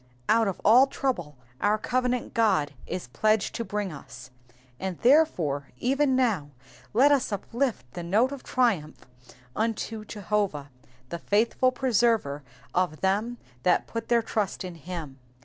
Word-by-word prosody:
Out 225 0 +4
of 195 - -3
all 245 +6 +7
trouble 180 - -3 0.2
our 210 +1 +3
covenant 250 +2 -1
God 155 -11 +2
is 180 -9 -4
pledged 215 - +1
to 230 +1 -3
bring 210 -3 -3
us, 130 -3 -11 0.5
and 190 -3 -3
therefore 180 - +3
even 270 - +2
now 220 - +1 0.4
let 270 +6 +5
us 275 -5 +2
uplift 230 - -2
the 175 - -5
note 210 +10 +2
of 280 -2 -6
triumph 210 -12 0 0.5
unto 225 0 -2
Jehovah, 200 -8 -2 0.4
the 170 - -5
faithful 230 +7 +2
preserver 230 - +1 0.3
of 175 -4 0
them 210 +6 0 0.2
that 180 +3 +2
put 230 -1 -5
their 235 -1 +3
trust 210 -4 -2
in 180 - -6
him. 165 -4 -7
215 Hz, 140 wpm, -27 LUFS, 175-245 Hz, 0.5 s, all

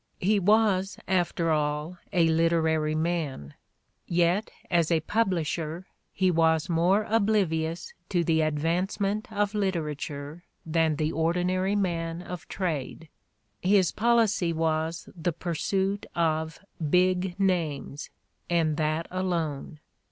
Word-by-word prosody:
He 205 +3 +2
was, 200 -1 +2
after 175 -3 +1
all, 150 +3 -1
a 170 -2 +3
literary 160 -1 +2
man; 155 - -2 0.5
yet 175 +4 +2 0.2
as 170 -3 +3
a 165 -2 +2
publisher 170 -4 -1 0.3
he 185 -1 +2
was 160 -1 +2
more 180 +4 +3
oblivious 190 -7 0 0.2
to 175 -3 +1
the 160 -1 +2
advancement 185 +8 -1
of 205 -1 0
literature 155 -5 -3 0.2
than 160 -1 +1
the 155 +1 -1
ordinary 180 +4 0
man 170 -3 -1
of 180 -3 -8
the - - -13
trade. 160 -3 -3 0.5
His 190 -1 +3
policy 225 -6 +2
was 160 +1 -1
the 175 0 -1
pursuit 190 +4 -1
of 160 -1 0 0.3
"big" 180 +2 +2
names, 165 -7 -1 0.4
and 160 -3 +1
that 155 +1 0
alone. 170 -5 -2
170 Hz, 115 wpm, -27 LUFS, 160-190 Hz, 0.5 s, a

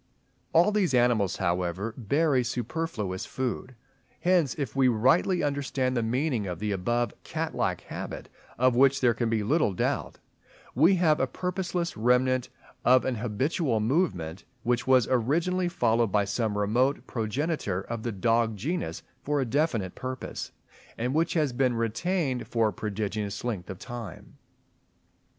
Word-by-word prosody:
All 175 +6 +5
these 195 -10 +2
animals, 120 -6 +3
however, 90 +4 -1
bury 135 +3 +2
superfluous 120 - -3
food. 130 0 -4 0.5
Hence, 175 -5 +2
if 140 -6 -4
we 135 -1 +4
rightly 130 - +3
understand 140 -3 -1
the 120 - +1
meaning 120 -1 0
of 90 -2 -4
the 105 +2 -2
above 120 +4 0
cat - - -3
like - - -1
habit, - - -7 0.3
of 130 0 +3
which 135 +2 +5
there 125 -3 +4
can 115 0 -1
be 110 -2 0
little 130 - +2
doubt, - - -1 0.6
we 165 +9 +5
have 165 -4 +3
a 130 - +2
purposeless 180 +1 -3
remnant 125 +2 +2 0.3
of 130 +1 +5
an 130 - 0
habitual 120 - 0
movement, 105 - 0 0.2
which 120 +1 0
was 130 -3 +5
originally 165 +9 +1
followed 115 - +1
by 100 0 +2
some 105 +1 -1
remote 120 +7 +1
progenitor 115 - -2
of 115 +3 -5
the 120 - -2
dog 115 +2 +1
genus 165 - -3 0.2
for 145 0 0
a 135 - +1
definite 120 - 0
purpose, 130 0 -6 0.5
and 125 +3 -1
which 165 +3 +1
has 150 -6 +1
been 125 -1 +1
retained 130 - -1
for 115 -2 +2
a - - -7
prodigious 105 -1 -3
length 105 -8 -3
of 95 - -6
time. 115 -6 -9
125 Hz, 150 wpm, -27 LUFS, 110-145 Hz, 0.6 s, All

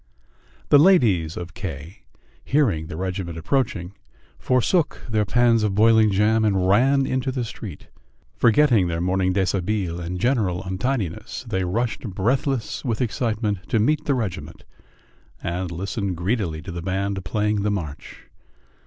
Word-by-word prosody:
The 145 - +7
ladies 110 - +4
of 85 0 -7
K, 85 - -7 0.4
hearing 105 - +1
the 80 - -7
regiment 90 -2 -4
approaching, 100 - -1 0.5
forsook 130 +7 +1
their 110 -3 +1
pans 120 +1 +3
of 105 -2 0
boiling 110 0 +5
jam 105 +3 +2
and 95 -3 +2
ran 135 +7 +4
into 130 0 -1
the 125 -1 -2
street. 105 -6 -9 0.5
Forgetting 115 -5 +4
their 85 -1 -2
morning 95 +1 +1
deshabille 95 -1 -1
and 90 +1 -4
general 105 -7 0
untidiness, 105 +3 -3
they 95 -4 -1
rushed 115 +6 -1
breathless 120 - -1
with 115 -5 -2
excitement 105 -6 -2
to 115 - +2
meet 145 +8 +1
the 140 - +1
regiment, 90 - -5 0.8
and 90 +1 -2
listened 95 +1 -3
greedily 85 -4 -2
to 95 - -7
the 85 0 -5
band 95 +1 -2
playing 105 +2 0
the 105 - 0
march. 85 -8 -5
100 Hz, 140 wpm, -23 LUFS, 90-120 Hz, 0.8 s, The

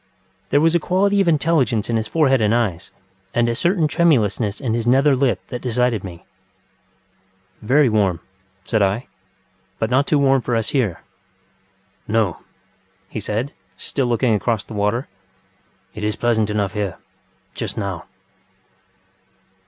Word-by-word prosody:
There 145 - +3
was 165 +2 +3
a 170 - +3
quality 200 +4 +2
of 195 - +1
intelligence 145 -9 +2
in 115 - -1
his 110 -1 -1
forehead 135 -6 +2
and 110 +1 +3
eyes, 100 -6 -1 0.5
and 120 0 +3
a 120 - +1
certain 170 - +1
tremulousness 115 - +1
in 125 -6 -2
his 115 0 -1
nether 135 +3 +4
lip 130 -1 +1
that 125 -2 -5
decided 125 -3 0
me. 85 -3 -9 1.4
ŌĆ£Very 135 +6 +4
warm, 100 -6 +2
ŌĆØ - - -26 0.5
said 110 -2 +1
I; 100 +6 0 0.7
ŌĆ£but 110 +1 -1
not 140 +3 +3
too 150 - +3
warm 135 -2 +3
for 120 - -1
us 115 -2 -1
here. 115 - 0 1.1
ŌĆØ - - -3
ŌĆ£No, 105 -7 +2
ŌĆØ - - -18 0.7
he - - -5
said, 110 +6 -3 0.2
still 135 -3 -2
looking 120 0 +2
across 110 0 0
the - - -11
water, 105 +5 -1 0.9
ŌĆ£it 105 - -6
is 105 -1 -1
pleasant 110 -2 +1
enough 105 -2 -1
here.... 105 -4 -3 0.6
just - - -5
now. 100 -5 -4
120 Hz, 155 wpm, -20 LUFS, 105-135 Hz, 1.4 s, nether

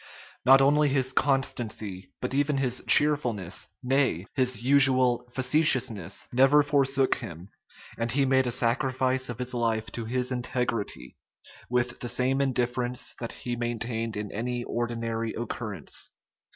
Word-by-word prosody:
Not 135 +1 +7
only 145 +1 +4
his 135 -1 +1
constancy, 110 -9 -1
but 125 - -3
even 145 +1 +1
his 130 -2 -1
cheerfulness, 120 - +2 0.2
nay, 130 - +1
his 125 -4 0
usual 130 -3 +4
facetiousness, 130 - 0
never 135 +4 +5
forsook 140 -2 +2
him; 85 +3 -9 0.5
and 115 0 -1
he 135 +2 +2
made 130 -1 +2
a - - -1
sacrifice 130 +2 0
of 120 - -5
his 125 0 -3
life 115 -2 -1
to 115 - -5
his 125 +2 -1
integrity, 125 - -3 0.5
with 125 0 0
the 120 - -3
same 130 +3 +1
indifference 125 -1 -1
that 115 - -5
he 120 -1 -5
maintained 115 -2 -3
in 105 -1 -5
any 120 +3 -3
ordinary 115 -1 -3
occurrence. 110 - -5
125 Hz, 135 wpm, -27 LUFS, 115-135 Hz, 0.5 s, Not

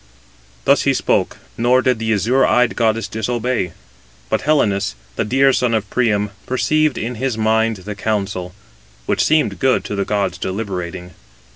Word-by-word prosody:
Thus - - +4
he - - +2
spoke, - - 0 0.2
nor 125 +2 +3
did 125 -4 +1
the 110 0 -1
azure 115 +6 +2
eyed 125 -1 +3
goddess 115 -1 +1
disobey. 110 -4 -2 0.6
But - - +1
Helenus, 100 - +1 0.2
the - - 0
dear 135 +4 +3
son 120 -3 +1
of 110 -2 -1
Priam, 105 -4 +1 0.2
perceived 155 +3 +1
in 120 +3 -3
his 130 -4 -1
mind 110 0 +2
the 105 - -4
counsel, 95 -4 -3 0.5
which - - +1
seemed 155 0 +2
good 130 -1 +2
to 105 - -4
the 100 - 0
gods 95 -3 -1
deliberating. 90 -3 -4
110 Hz, 155 wpm, -19 LUFS, 100-125 Hz, 0.6 s, Thus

